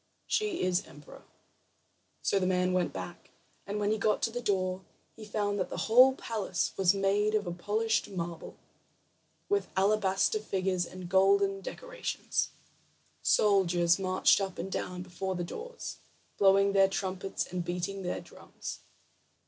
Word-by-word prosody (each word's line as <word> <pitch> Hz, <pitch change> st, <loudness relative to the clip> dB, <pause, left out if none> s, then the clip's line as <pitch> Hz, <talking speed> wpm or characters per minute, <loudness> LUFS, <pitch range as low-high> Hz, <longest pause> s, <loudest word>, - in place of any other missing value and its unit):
"She 425 Hz, -5 st, 0 dB
is 185 Hz, -1 st, +1 dB
emperor." 145 Hz, +1 st, -14 dB, 1.0 s
So 200 Hz, -, +2 dB
the 185 Hz, -, 0 dB
man 180 Hz, 0 st, +1 dB
went 180 Hz, -1 st, +1 dB
back, 175 Hz, -, -8 dB, 0.4 s
and 205 Hz, +1 st, -2 dB
when 205 Hz, 0 st, +1 dB
he 220 Hz, -, 0 dB
got 210 Hz, +1 st, +1 dB
to 225 Hz, -, +1 dB
the 245 Hz, +1 st, -4 dB
door, 185 Hz, -4 st, 0 dB, 0.3 s
he 220 Hz, -, -11 dB
found 205 Hz, -1 st, -1 dB
that 185 Hz, -, -1 dB
the -, -, -5 dB
whole 255 Hz, +4 st, +7 dB
palace 205 Hz, -9 st, -2 dB
was 190 Hz, 0 st, +3 dB
made 205 Hz, +2 st, +2 dB
of 180 Hz, -5 st, -2 dB
polished 220 Hz, +3 st, 0 dB
marble, 170 Hz, -3 st, -6 dB, 0.9 s
with 405 Hz, 0 st, +1 dB
alabaster 195 Hz, +1 st, +2 dB
figures 190 Hz, -4 st, -1 dB
and 185 Hz, -1 st, -8 dB
golden 195 Hz, +1 st, +3 dB
decorations. -, -, -3 dB, 0.7 s
Soldiers 180 Hz, -4 st, +3 dB
marched 185 Hz, +1 st, +3 dB
up 195 Hz, -2 st, -3 dB
and 190 Hz, +3 st, -5 dB
down 180 Hz, -1 st, -3 dB
before 185 Hz, +1 st, -4 dB
the 175 Hz, -, -2 dB
doors, 475 Hz, -, -7 dB, 0.4 s
blowing 195 Hz, 0 st, +4 dB
their 195 Hz, -1 st, +5 dB
trumpets 190 Hz, 0 st, -3 dB
and 180 Hz, -1 st, -1 dB
beating 180 Hz, +3 st, -3 dB
their 180 Hz, -, -3 dB
drums. -, -, -9 dB
195 Hz, 145 wpm, -30 LUFS, 185-210 Hz, 1.0 s, whole